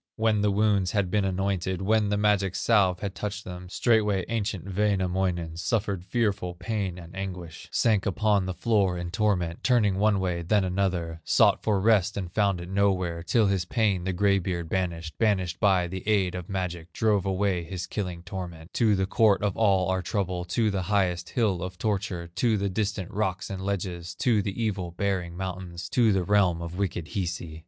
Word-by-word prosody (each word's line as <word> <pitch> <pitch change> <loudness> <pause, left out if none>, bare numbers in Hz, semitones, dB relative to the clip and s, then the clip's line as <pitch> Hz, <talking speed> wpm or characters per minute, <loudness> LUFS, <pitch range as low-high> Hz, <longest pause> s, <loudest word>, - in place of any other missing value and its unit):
When 110 -2 +2
the 105 - +3
wounds 100 -2 +2
had 100 -4 0
been 105 -1 +2
anointed, 95 -1 -1
When 105 +1 +2
the 105 - +1
magic 100 -3 +2
salve 95 -6 +2
had 100 -2 -3
touched 105 0 -5
them, 90 0 -8
Straightway 105 -3 +2
ancient 105 -6 -2
Wainamoinen 95 -4 0
Suffered 100 -2 -1
fearful 95 -3 -1
pain 95 -1 -3
and 85 0 -11
anguish, 90 -4 -6
Sank 105 -4 +2
upon 100 0 +1
the 95 - -2
floor 95 -2 +1
in 85 0 -5
torment, 95 -4 0
Turning 105 -7 +3
one 105 -1 +3
way, 90 -2 -1
then 100 +4 +2
another, 90 -3 -1
Sought - - +4
for 105 -2 +1
rest 105 -1 +3
and 90 -3 -4
found 100 -3 +2
it 85 - -7
nowhere, 95 -3 0
Till 110 +6 +2
his 95 -2 +1
pain 100 -3 +1
the 95 - -1
gray 100 +2 +2
beard 85 -2 -3
banished, 85 -3 -3
Banished 95 -6 +1
by 95 -4 +3
the 95 +2 -5
aid 100 -4 +2
of 90 -2 -6
magic, 90 -3 -4
Drove 105 -4 +1
away 95 -2 0
his 90 +1 -5
killing 90 -2 -4
torment 85 -2 -7
To 110 -4 +3
the 95 0 +1
court 100 -1 +3
of 100 -2 0
all 95 -4 +3
our 95 0 +1
trouble, 90 -1 -2
To 110 +5 +1
the 95 -1 -1
highest 90 -3 0
hill 105 -7 0
of 90 0 -5
torture, 95 -4 -2
To 115 +2 +2
the 100 0 -1
distant 100 -1 -2
rocks 95 -3 -2
and 95 -1 -5
ledges, 90 -3 -3
To 115 -5 +2
the 100 +2 -4
evil 95 -5 -2
bearing 90 -4 -1
mountains, 90 -2 -5
To 115 -3 +3
the 95 -2 +1
realm 95 -3 +3
of 85 +1 -6
wicked 90 -4 -2
Hisi. 85 -5 -4
95 Hz, 190 wpm, -27 LUFS, 90-105 Hz, -, Sought